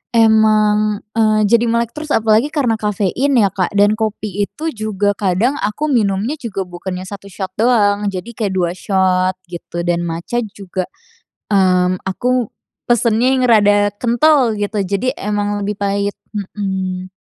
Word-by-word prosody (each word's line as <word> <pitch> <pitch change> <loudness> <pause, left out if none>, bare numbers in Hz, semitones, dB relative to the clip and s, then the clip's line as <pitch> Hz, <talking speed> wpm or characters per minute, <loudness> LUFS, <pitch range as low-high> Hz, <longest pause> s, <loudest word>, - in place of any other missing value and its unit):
emang, 215 -2 +3
eee, 215 -1 +2
jadi 235 +2 +3
melek 235 0 0
terus 305 0 -7
apalagi 220 +4 +3
karena 285 -7 0
kafein 210 +7 0
ya, 200 -4 +3
Kak 190 0 -2
dan 205 +1 +5
kopi 210 -2 -2
itu 320 +1 -5
juga 210 -2 -1
kadang 210 - +1
aku 290 +9 -1
minumnya 215 +1 +1
juga 205 -6 -4
bukannya 180 +1 -6
1 200 0 -9
shot, 190 0 -6
doang. 210 -4 +3
Jadi 195 +3 -4
kayak 210 -4 -2
2 175 -2 +1
shot 185 -1 +1 0.2
gitu 170 0 -5
dan 175 0 0
matcha 170 +8 -3 0.2
juga, 185 -2 -4 0.7
mmm, 185 -1 +2
aku 245 +4 0 0.4
pesennya 235 0 +2
yang 255 - +1
rada 205 -2 +4
kental 250 +1 +3
gitu, 205 +1 -2
jadi 200 +7 -1
emang 205 0 -2
lebih 205 0 -3
pahit. 200 0 -1 0.2
Mhm. 190 -2 -3
205 Hz, 145 wpm, -17 LUFS, 190-230 Hz, 0.7 s, dan